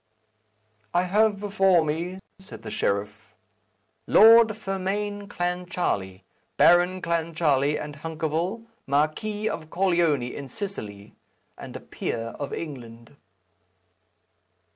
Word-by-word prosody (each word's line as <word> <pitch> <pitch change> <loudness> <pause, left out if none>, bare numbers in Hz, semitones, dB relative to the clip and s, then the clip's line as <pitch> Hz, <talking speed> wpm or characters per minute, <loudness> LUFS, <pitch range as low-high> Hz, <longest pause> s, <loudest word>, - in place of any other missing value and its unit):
"I 175 - +4
have 205 +2 +2
before 195 -5 +3
me," 170 +5 -3 0.2
said 190 - -12
the - - -7
sheriff, 100 +1 -3 0.7
"Lord 230 +1 +8
Fermain 205 +1 -3
Clancharlie, 175 - -2 0.4
Baron 175 +1 +4
Clancharlie 160 -4 +1
and 150 -1 -7
Hunkerville, 165 +7 -3 0.2
Marquis 155 +10 0
of 155 -6 -4
Corleone 170 -7 +2
in 140 -2 -7
Sicily, 110 - -7 0.4
and - - -10
a - - -5
peer 115 0 -4
of 145 - -4
England." 120 -7 -8
170 Hz, 100 wpm, -25 LUFS, 145-195 Hz, 0.7 s, Lord